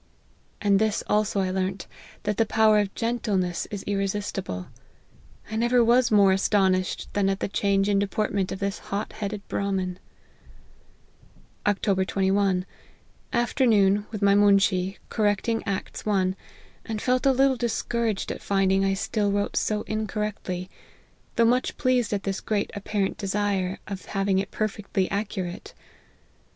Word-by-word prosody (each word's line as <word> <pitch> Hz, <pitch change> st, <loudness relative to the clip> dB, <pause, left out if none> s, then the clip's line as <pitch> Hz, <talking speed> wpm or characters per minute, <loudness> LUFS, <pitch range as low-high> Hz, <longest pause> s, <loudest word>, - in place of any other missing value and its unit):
And 200 Hz, -1 st, +3 dB
this 215 Hz, -1 st, +1 dB
also 210 Hz, -1 st, +1 dB
I 185 Hz, -1 st, -1 dB
learnt, 190 Hz, 0 st, -2 dB, 0.4 s
that 210 Hz, -1 st, -1 dB
the -, -, +4 dB
power 220 Hz, -1 st, +4 dB
of 200 Hz, -1 st, -2 dB
gentleness 210 Hz, -7 st, -1 dB
is 205 Hz, -2 st, -5 dB
irresistible. 195 Hz, -, -2 dB, 0.9 s
I -, -, -3 dB
never 240 Hz, +2 st, +3 dB
was 240 Hz, +1 st, +4 dB
more 200 Hz, -3 st, +5 dB
aston 195 Hz, 0 st, +3 dB
ished 185 Hz, 0 st, -2 dB
than 200 Hz, -1 st, +2 dB
at 195 Hz, 0 st, -1 dB
the -, -, -1 dB
change 200 Hz, 0 st, +1 dB
in 200 Hz, -1 st, +3 dB
deportment 200 Hz, -1 st, -1 dB
of -, -, -3 dB
this 200 Hz, 0 st, -2 dB
hot 200 Hz, +2 st, -3 dB
headed 210 Hz, -1 st, -5 dB
Brahmin." 190 Hz, -2 st, -2 dB, 0.9 s
" -, -, -31 dB
Oct. 195 Hz, -2 st, +1 dB
21. 195 Hz, -1 st, +1 dB, 0.7 s
Afternoon, 215 Hz, -5 st, +3 dB
with 215 Hz, -2 st, -5 dB
my 200 Hz, 0 st, +5 dB
moonshee, 195 Hz, -2 st, +3 dB
cor 215 Hz, -, 0 dB
recting 215 Hz, +2 st, +1 dB
Acts 195 Hz, -1 st, -3 dB
i., 190 Hz, -3 st, +2 dB, 0.5 s
and 220 Hz, -1 st, -4 dB
felt 255 Hz, +4 st, +1 dB
a -, -, +6 dB
little 265 Hz, +1 st, +3 dB
discouraged 235 Hz, -3 st, -1 dB
at -, -, -6 dB
finding 195 Hz, -1 st, +2 dB
I 195 Hz, 0 st, +2 dB
still 205 Hz, +1 st, 0 dB
wrote 205 Hz, 0 st, -1 dB
so 210 Hz, -1 st, 0 dB
incorrectly, 210 Hz, -4 st, -3 dB, 0.7 s
though 230 Hz, -, +4 dB
much 250 Hz, +2 st, +1 dB
pleased 255 Hz, -3 st, +1 dB
at 200 Hz, -2 st, -1 dB
this 195 Hz, 0 st, -2 dB
great 210 Hz, -2 st, -1 dB
apparent 200 Hz, -1 st, -2 dB
desire 195 Hz, -2 st, -1 dB
of 195 Hz, -2 st, -7 dB
having 195 Hz, -1 st, 0 dB
it 195 Hz, -, -3 dB
perfectly 205 Hz, -3 st, -2 dB
accurate. 195 Hz, -3 st, -4 dB
200 Hz, 145 wpm, -25 LUFS, 195-215 Hz, 0.9 s, a